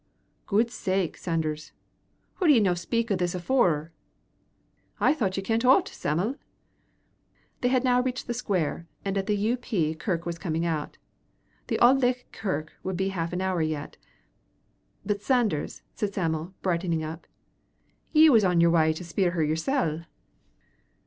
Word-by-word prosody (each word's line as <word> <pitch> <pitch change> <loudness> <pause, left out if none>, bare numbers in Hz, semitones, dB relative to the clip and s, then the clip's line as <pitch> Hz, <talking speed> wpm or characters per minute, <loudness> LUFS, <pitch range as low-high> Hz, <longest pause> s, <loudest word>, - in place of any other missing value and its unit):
"Guid 225 +3 +2
sake, 190 -6 -1
Sanders, 155 -3 -3 0.6
hoo 365 - +1
did 295 - +7
ye - - +6
no 195 -4 +3
speak 225 +6 -2
o' - - +3
this 180 -1 -1
afoore?" 175 - +1 1.1
"I - - +4
thocht 200 -11 -1
ye 195 - -2
kent 225 +3 0
o't, 270 +10 +5
Sam'l." 185 - -2 1.2
They 245 - +1
had 255 0 +2
now 250 -1 +3
reached 255 0 -3
the 240 - -2
square, 180 -8 -2 0.2
and 195 0 -1
the 200 +2 0
U.P. 210 -6 0
kirk 170 0 -3
was 170 -1 -4
coming 165 0 -2
out. 155 -3 -3 0.7
The - - 0
Auld 260 +3 +5
Licht 250 0 0
kirk 155 -7 -3
would 190 -1 -3
be 190 +1 0
half 170 -3 -3
an 180 +1 -2
hour 185 -2 0
yet. 155 -2 -3 1.1
"But, 205 -1 -1
Sanders," 220 - 0
said 200 -2 -3
Sam'l, 165 0 -2
brightening 170 -3 0
up, 160 +2 -7 0.8
"ye 315 0 +7
was 225 -4 +6
on 180 -2 +3
yer 170 0 +5
wy 160 -2 +4
to 160 - -7
spier 175 +1 0
her 165 -3 +1
yersel." 160 - 0
185 Hz, 155 wpm, -27 LUFS, 165-230 Hz, 1.2 s, did